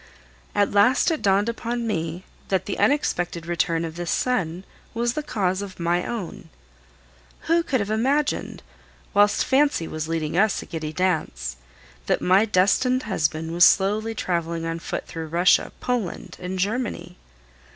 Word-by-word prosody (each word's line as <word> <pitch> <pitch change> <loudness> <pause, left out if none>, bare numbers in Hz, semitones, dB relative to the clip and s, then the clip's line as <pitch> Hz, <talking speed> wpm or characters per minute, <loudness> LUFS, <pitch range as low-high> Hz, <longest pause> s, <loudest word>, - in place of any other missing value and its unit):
At 205 -1 +2
last 250 - +4
it 315 - -2
dawned 200 +2 +3
upon 235 +1 -3
me 170 -4 -3 0.2
that 190 -1 0
the 200 - -4
unexpected 175 - +1
return 170 -1 0
of 165 0 -7
this 175 -1 -4
son 185 -8 0 0.3
was 235 +1 0
the 305 - -2
cause 195 -9 -1
of 195 -2 -8
my 175 +1 +1
own. 215 -8 -6 0.9
Who 335 +1 +2
could 275 -6 0
have 205 0 -2
imagined, 275 +7 0 0.5
whilst 205 0 +4
fancy 270 - +2
was 155 0 -4
leading 160 -1 -2
us 210 +3 +3
a - - -12
giddy 160 -3 -5
dance, 155 - -1 0.5
that - - +2
my 190 +4 +4
destined 225 +6 +2
husband 160 -5 -1
was 175 +1 +4
slowly 210 +4 +3
traveling 170 -3 -2
on 165 0 -3
foot - - -4
through 160 -1 -6
Russia, 175 +3 +3
Poland, 240 -8 -3
and 185 +1 -4
Germany? 195 -4 -2
190 Hz, 150 wpm, -24 LUFS, 170-225 Hz, 0.9 s, last